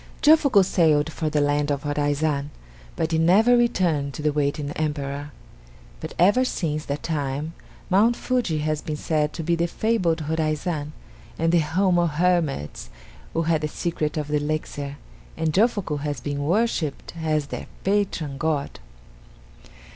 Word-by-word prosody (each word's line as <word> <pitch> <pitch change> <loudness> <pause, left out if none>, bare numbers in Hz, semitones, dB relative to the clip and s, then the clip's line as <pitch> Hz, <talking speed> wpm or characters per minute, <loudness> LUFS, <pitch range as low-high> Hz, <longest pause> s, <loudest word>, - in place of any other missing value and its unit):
Jofuku 290 -9 +6
sailed 160 -4 +3
for 155 0 -2
the 150 -1 +1
land 145 0 +1
of 140 -1 -1
Horaizan, 145 0 0 0.5
but 160 +1 -1
he 160 - +2
never 205 +9 +5
returned 175 - +1
to 150 - -6
the 150 -1 +2
waiting 145 0 -1
Emperor; 145 -2 -3 0.7
but 160 - -7
ever 205 +9 +5
since 155 -11 -2
that 140 +1 -4
time 150 0 -2 0.3
Mount 210 +6 +4
Fuji 240 -13 -1
has 155 -1 -1
been 155 -1 -4
said 150 -1 0
to 165 - -5
be 170 +2 +1
the 170 +1 0
fabled 180 -5 0
Horaizan 155 0 -2 0.4
and 165 0 +1
the 175 - +4
home 175 +3 +2
of 170 -3 +1
hermits 155 - 0 0.4
who 165 - +1
had 160 -1 +1
the 150 - 0
secret 155 -1 -2
of 150 -1 -2
the 150 - +2
elixir, 145 -1 -3 0.4
and 160 -1 0
Jofuku 205 -7 +1
has 145 -2 -3
been 145 +1 -3
worshipped 175 -4 0
as 155 -2 0
their - - -5 0.2
patron 185 -8 -1
god. 150 - -1
155 Hz, 155 wpm, -24 LUFS, 145-175 Hz, 0.7 s, Jofuku